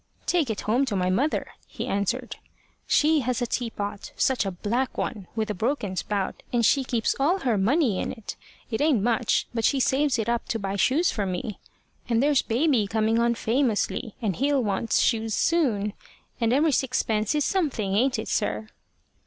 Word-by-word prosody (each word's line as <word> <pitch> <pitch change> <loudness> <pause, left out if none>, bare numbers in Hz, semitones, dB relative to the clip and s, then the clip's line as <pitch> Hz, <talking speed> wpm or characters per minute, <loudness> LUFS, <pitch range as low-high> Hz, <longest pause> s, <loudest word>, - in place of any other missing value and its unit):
"Take 330 -8 +1
it 220 - -2
home 235 +6 +1
to 225 -6 -2
my 185 -1 +1
mother," 275 +11 0 0.2
he - - -5
answered. 235 +6 -2 0.5
"She 310 +1 +4
has 250 -2 -1
a 245 - 0
teapot 210 -4 -4
such 255 -6 +1
a - - -1
black 235 +8 -2
one! 205 -6 -3
with 220 -1 -1
a - - -1
broken 210 -1 -2
spout, 200 0 -2
and 235 -2 +2
she 275 +4 +4
keeps 235 -3 0
all 340 +8 +2
her 245 -4 +1
money 225 - +2
in - - -2
it. 225 -4 -7 0.4
It 220 - -1
ain't 290 -9 +3
much; 235 0 +1
but 230 -1 -2
she 275 +4 +3
saves 270 +1 +2
it 220 -1 -2
up 235 0 -1
to 225 - -1
buy 195 -2 -3
shoes 290 - +2
for 205 -3 -2
me. 185 +3 -4 0.5
And 230 - +2
there's 290 -1 +4
baby 245 -2 +1
coming 220 +2 +1
on 235 0 +2
famously, 230 -2 0
and 200 -5 0
he'll 275 0 +1
want 205 +2 -2
shoes 225 -2 +2
soon. 225 -12 +1 0.5
And 230 -1 +2
every 295 +5 +3
sixpence 235 -3 0
is 295 -1 +1
something 275 - 0
ain't 245 +4 +2
it, 220 - -4
sir?" 105 +1 -1
230 Hz, 185 wpm, -25 LUFS, 210-270 Hz, 0.5 s, She